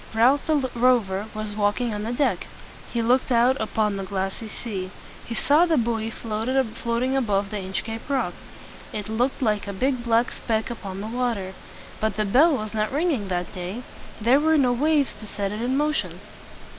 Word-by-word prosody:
Ralph 255 +5 +4
the 295 -4 +2
Rover 230 -5 +2
was 215 -1 -4
walking 210 +3 +1
on 210 - -3
the 220 +2 -3
deck. 275 +4 0 0.4
He 235 -1 0
looked 255 +3 +2
out 245 +2 +5
upon 215 -2 0
the 195 - -3
glassy 195 +3 -3
sea. 200 -4 -5 0.4
He 230 - -4
saw 300 +9 +4
the 325 -2 +3
buoy 225 -2 0
floating 235 +2 -1
above 205 -6 +1
the 210 - -2
Inchcape 220 +6 -4
Rock. 275 -2 0 0.6
It 210 0 -5
looked 245 +5 0
like 210 -3 +1
a 200 - -3
big 255 +4 0
black 235 +1 +2
speck 220 0 -2
upon 195 -4 -6
the 210 - -4
water. 230 -5 -2 0.5
But 220 -2 0
the 215 - +1
bell 280 +9 +5
was 215 -1 -5
not 215 -1 0
ringing 285 - 0
that 180 -1 -2
day. 185 +7 -5 0.4
There 240 +5 +4
were 315 +1 +3
no 255 -4 +4
waves 290 +2 +2
to 215 - -8
set 200 -1 -3
it 210 +2 -4
in 255 +3 0
motion. 300 +1 0
230 Hz, 180 wpm, -24 LUFS, 210-255 Hz, 0.6 s, out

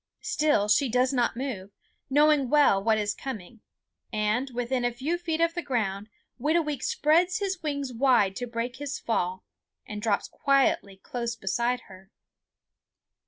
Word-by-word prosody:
Still 295 -9 +2
she 245 +6 +3
does 250 +3 +2
not 240 -2 +1
move, 240 -8 -4 0.4
knowing 290 -1 +4
well 285 -10 +4
what 220 0 +3
is 210 -1 0
coming, 230 -4 -8 0.5
and 215 +5 0
when 245 - -15
within 245 +1 -1
a 245 - +1
few 270 +8 -2
feet 325 -2 -2
of 335 0 +2
the 345 - -3
ground 210 - -2 0.3
Whitooweek 300 -1 0
spreads 345 +7 +2
his 385 -3 -2
wings 280 -4 -3
wide 235 -6 +3
to 245 - -4
break 235 +2 -4
his 280 -1 -4
fall 185 -4 -2 0.4
and 210 -1 -6
drops 210 -2 0
quietly 270 -8 +1
close 235 +3 -4
beside 235 +4 -1
her. 190 -1 -15
245 Hz, 155 wpm, -27 LUFS, 215-290 Hz, 0.5 s, knowing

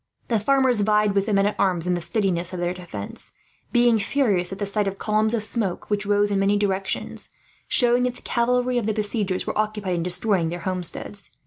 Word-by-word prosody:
The 230 -3 +2
farmers 260 0 +2
vied 210 0 +2
with 200 +1 +1
the 215 - 0
men 195 0 +3
at 205 - 0
arms 180 -4 +1
in 180 - +1
the 175 - -2
steadiness 180 -1 0
of 180 - -4
the 175 0 -1
defence, 170 - -6 0.4
being 240 -2 +4
furious 200 -6 +1
at 190 - -5
the 205 - -2
sight 200 0 -1
of 195 0 -3
columns 215 +2 +1
of 220 - -1
smoke 210 -3 -2
which 205 0 +1
rose 205 0 +2
in 200 - +1
many 200 +1 +2
directions, 195 -1 -2 0.4
showing 245 -1 +3
that 250 0 -2
the - - -14
cavalry 245 +1 +1
of 220 - -3
the 220 - +1
besiegers 205 -3 0
were - - -3
occupied 210 -3 -1
in 170 - -1
destroying 180 0 +1
their 175 +1 -5
homesteads. 185 +2 -2
205 Hz, 215 wpm, -23 LUFS, 185-220 Hz, 0.4 s, being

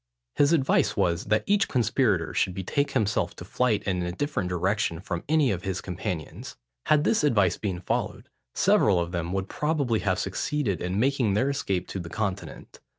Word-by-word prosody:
His 145 +1 +3
advice 145 -5 +2
was, 85 0 +1
that 105 +1 +1
each 200 0 +2
conspirator 120 -5 +1
should 90 - 0
betake 140 +10 -1
himself 110 -6 0
to - - -9
flight 120 -5 0
in 95 -2 -1
a 90 0 -2
different 145 -3 -2
direction 90 0 0
from 90 -2 -4
any 155 -5 +3
of 90 -3 -2
his 95 -2 -3
companions. 90 -3 -5 0.3
Had 150 -1 +4
this 220 -2 +2
advice 100 - +3
been 95 -4 -3
followed, - - -3 0.3
several 95 -4 +4
of 85 0 -2
them 85 -1 -3
would 95 0 -2
probably 145 -6 0
have 95 -2 0
succeeded 100 +2 -2
in 90 +3 -1
making 125 -5 +2
their 130 +6 +2
escape 100 -10 -2
to 95 - -4
the 85 -2 -7
Continent. 100 0 -5
100 Hz, 180 wpm, -26 LUFS, 90-135 Hz, 0.3 s, Had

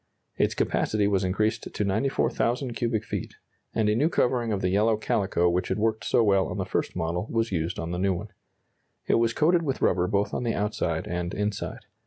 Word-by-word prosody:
Its - - +1
capacity 105 -2 +1
was 100 -2 +1
increased 105 +4 0
to - - -2
94,000 120 +3 0
cubic 115 -2 -1
feet, - - -5 0.4
and 110 -2 +2
a 105 - +3
new 145 +8 +3
covering 120 -7 +1
of 100 - 0
the 90 - +1
yellow 105 +3 +3
calico 95 -5 +1
which 90 +1 +1
had - - -1
worked 110 0 0
so 120 - +3
well 100 -3 +3
on - - -5
the - - -1
first - - -2
model 90 +3 -2
was 115 -1 0
used 80 -2 -1
on 85 0 -4
the 90 - -2
new 95 0 +2
one. 105 +5 -6 0.8
It - - +3
was 115 -1 +2
coated 170 +3 +3
with 140 -5 -2
rubber 90 -1 +3
both 100 +2 0
on - - -1
the 115 -2 -1
outside 100 -6 -1
and 90 0 -3
inside. 105 -1 -3
105 Hz, 210 wpm, -26 LUFS, 90-115 Hz, 0.8 s, a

